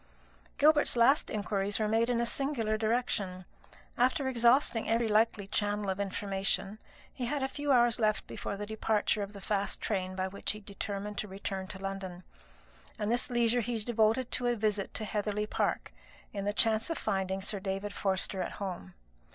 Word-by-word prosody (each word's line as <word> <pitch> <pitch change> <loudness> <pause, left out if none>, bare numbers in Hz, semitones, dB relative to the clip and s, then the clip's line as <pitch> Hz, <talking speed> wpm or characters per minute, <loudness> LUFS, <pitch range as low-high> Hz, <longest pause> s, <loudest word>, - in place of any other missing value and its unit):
Gilbert's 300 -2 +5
last 245 +5 +4
inquiries 205 -1 -1
were 215 - +1
made 225 +2 +2
in 240 -1 +2
a 235 - +2
singular 235 -4 0
direction. 215 -5 -1 0.5
After 260 +3 +3
exhausting 240 -1 +3
every 230 0 +2
likely 215 -1 +2
channel 205 0 0
of 190 - -4
information, 195 +1 -2 0.3
he 245 - -3
had 280 +1 -1
a - - +2
few 290 +1 -2
hours 240 -3 +4
left 215 -2 +1
before 200 - -5
the 205 - -4
departure 215 0 0
of 200 +1 -5
the 200 - -8
fast 200 0 -1
train 185 -3 -2
by 185 0 -1
which 200 +2 -3
he - - -8
had 210 - -14
determined 200 0 -4
to 210 - -3
return 195 -1 -4
to 190 - -7
London; 190 -2 -5 0.7
and 210 +1 -1
this 240 +1 +1
leisure 240 0 +2
he 235 +1 -2
devoted 225 +2 +1
to 245 - 0
a 240 - +2
visit 210 -3 -1
to 215 - -1
Heatherly 210 0 -1
Park, - - -1 0.4
in 200 -1 -3
the 205 - +1
chance 220 +5 +2
of 330 - -1
finding 190 -2 -1
Sir 200 +1 -2
David 195 +1 -3
Forster 190 -1 0
at - - -3
home. 180 - -6
210 Hz, 185 wpm, -31 LUFS, 195-235 Hz, 0.7 s, Gilbert's